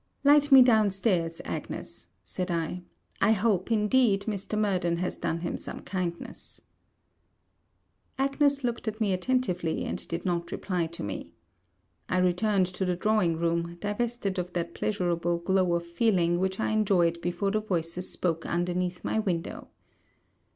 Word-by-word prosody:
'Light 290 0 +5
me 265 -1 +10
down 220 -4 +4
stairs, 180 -4 0
Agnes,' - - -6 0.2
said 180 - -4
I. 170 +1 -2 0.4
'I 220 - +5
hope, 205 -1 +1
indeed, 215 -1 +3
Mr. 210 0 -3
Murden 185 -5 +1
has 180 +1 -2
done 165 +1 -2
him 170 - -2
some - - -5
kindness.' 180 -3 -5 1.6
Agnes 275 +1 +2
looked 240 -1 -2
at 220 0 -3
me 205 -4 +1
attentively, 185 -5 0
and - - -4
did 170 - -4
not 170 -2 -1
reply 180 -4 -1
to 170 +1 -8
me. 100 -1 -6 0.8
I 185 - +1
returned 185 +2 +2
to 190 - -2
the 180 -1 0
drawing 185 -4 +1
room, 170 +1 -1
divested 205 -1 -2
of 180 0 -4
that 170 -1 -2
pleasurable 175 -4 0
glow 180 0 +1
of 170 0 -2
feeling 175 -1 +2
which 190 +1 -1
I - - 0
enjoyed 180 -6 +2
before 175 +3 -1
the 215 +1 +1
voices 180 -3 -2
spoke 165 -2 -1
underneath 180 +1 -1
my - - 0
window. 180 -6 -3
185 Hz, 150 wpm, -28 LUFS, 170-215 Hz, 1.6 s, me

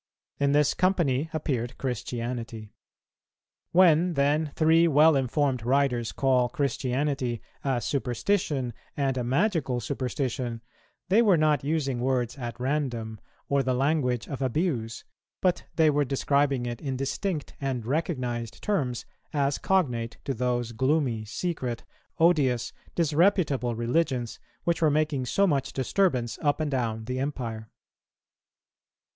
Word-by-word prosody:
In 140 0 +2
this 150 0 +3
company 165 -6 +1
appeared 130 -6 -2
Christianity. 120 -3 -4 1.0
When 175 -1 +5
then 145 +2 +1
three 165 +1 +4
well 155 +1 +5
informed 135 -1 0
writers 125 -2 +1
call 130 -2 +2
Christianity 130 -1 -1 0.2
a 135 -3 +1
superstition 135 - -1 0.2
and 135 -2 +1
a 125 - -1
magical 135 - +1
superstition, 125 -3 -3 0.5
they 210 +5 +5
were 200 -7 +5
not 150 -3 +2
using 140 -4 -1
words 125 -2 0
at 120 -1 -5
random, 125 -5 -2 0.3
or 140 0 +2
the 130 -1 0
language 130 -3 +1
of 140 -1 -5
abuse, 130 -4 -1 0.4
but 185 -2 +1
they 160 -2 +5
were 145 0 +2
describing 140 -1 +1
it 120 -1 -5
in 135 -3 -3
distinct 150 +4 -3
and 130 -4 -2
recognized 125 -5 -2
terms 135 - -1 0.3
as 140 -1 +1
cognate 125 -12 0
to 135 - -1
those 120 -1 -1
gloomy, 130 -2 0
secret, 125 -2 -3 0.3
odious, 140 -8 +2 0.2
disreputable 155 - +2
religions 120 0 -1 0.2
which 170 -1 0
were 155 - +5
making 150 -3 0
so 200 - +3
much 140 -7 0
disturbance 130 - 0
up 145 -2 +1
and 155 -2 -1
down 115 -4 -1
the 125 +2 -3
empire. 115 -6 -4
135 Hz, 125 wpm, -27 LUFS, 120-155 Hz, 1.0 s, When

